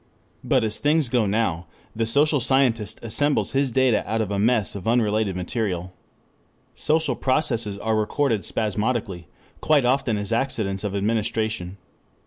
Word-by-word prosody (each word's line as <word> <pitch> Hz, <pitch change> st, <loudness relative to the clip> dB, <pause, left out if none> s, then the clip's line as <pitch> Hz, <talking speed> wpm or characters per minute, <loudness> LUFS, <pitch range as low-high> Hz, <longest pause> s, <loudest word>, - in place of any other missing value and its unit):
But -, -, +2 dB
as 105 Hz, -1 st, -1 dB
things 150 Hz, -2 st, +2 dB
go 120 Hz, -4 st, +1 dB
now, 95 Hz, -6 st, -1 dB, 0.3 s
the 115 Hz, 0 st, -1 dB
social 145 Hz, +5 st, +3 dB
scientist 120 Hz, -5 st, +1 dB
assembles 145 Hz, +6 st, +1 dB
his 135 Hz, 0 st, +1 dB
data 130 Hz, -1 st, +2 dB
out 110 Hz, -, 0 dB
of 105 Hz, -2 st, -2 dB
a 100 Hz, -, -1 dB
mass 110 Hz, 0 st, +2 dB
of 100 Hz, -1 st, -7 dB
unrelated 110 Hz, -4 st, +1 dB
material. 90 Hz, -1 st, -3 dB, 0.8 s
Social 155 Hz, -4 st, +1 dB
processes 120 Hz, -7 st, -1 dB
are 110 Hz, +2 st, -1 dB
recorded 110 Hz, +1 st, 0 dB
spasmodically, 105 Hz, -4 st, -2 dB, 0.3 s
quite 150 Hz, -4 st, +3 dB
often 125 Hz, -3 st, +1 dB
as 105 Hz, +1 st, -3 dB
accidents 110 Hz, -6 st, -1 dB
of 100 Hz, -1 st, -3 dB
administration. 105 Hz, -2 st, -2 dB
110 Hz, 140 wpm, -23 LUFS, 105-130 Hz, 0.8 s, social